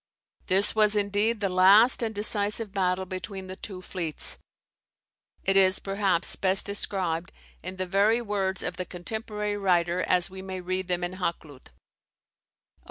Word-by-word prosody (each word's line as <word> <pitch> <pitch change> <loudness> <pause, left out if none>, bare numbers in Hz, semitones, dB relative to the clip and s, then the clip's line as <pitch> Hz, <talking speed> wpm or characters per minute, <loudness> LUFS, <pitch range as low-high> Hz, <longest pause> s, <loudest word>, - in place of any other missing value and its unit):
This 190 +2 +3
was 215 -1 +3
indeed 205 +2 0
the 200 - +1
last 195 +8 +6
and 220 -2 -2
the 205 - -2
decisive 210 0 +1
battle 185 -1 0
between 190 +1 -6
the 185 0 -8
two 190 -2 -8
fleets. 170 -6 -1 1.0
It 195 - +1
is, 190 0 +6
perhaps, 195 -3 -1
best 190 0 0
described 185 -4 -3 0.3
in 185 +1 -7
the 185 0 -3
very 200 +5 +3
words 200 -4 -2
of 180 0 -4
the 185 - -3
contemporary 210 +2 -4
writer 180 -2 +1
as 180 -1 +2
we 190 0 -8
may 190 -1 -6
read 185 +1 -3
them 180 -1 -1
in 180 +1 -4
Hakluyt. 160 -6 -5
[Vol. - - -32
190 Hz, 160 wpm, -27 LUFS, 185-205 Hz, 1.0 s, last